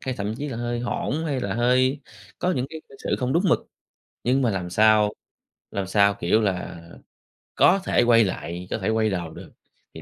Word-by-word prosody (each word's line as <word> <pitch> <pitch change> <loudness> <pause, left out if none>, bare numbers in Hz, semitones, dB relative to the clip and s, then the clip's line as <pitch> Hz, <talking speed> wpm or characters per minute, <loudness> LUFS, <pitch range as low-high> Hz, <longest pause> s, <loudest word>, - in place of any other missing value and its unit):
hay 130 -1 -3
thậm 105 +2 -3
chí 145 +2 -4
là 120 - -5
hơi 120 0 -2
hỗn 145 +5 -2
hay 135 -4 -1
là 100 -3 -2
hơi 130 +3 +2 0.4
có 180 +1 0
những 130 0 -1
cái 160 -1 -7
cư 135 - -16
xử - - 0
không 125 0 -1
đúng 170 +4 +2
mực. - - +4 0.7
Nhưng 130 +2 +2
mà 120 - +2
làm 90 -3 -3
sao, 105 +1 +4 0.6
làm 95 -2 -3
sao, 100 +1 +4
kiểu 100 +6 +2
là, 95 -4 -2 0.8
có 195 +2 +5
thể - - +3
quay 115 -1 +5
lại, 90 -2 -4
có - - 0
thể 95 +3 -2
quay 110 -1 +2
đầu 90 -4 -3
được, - - -11 0.4
thì - - -10
115 Hz, 210 wpm, -24 LUFS, 100-130 Hz, 0.8 s, có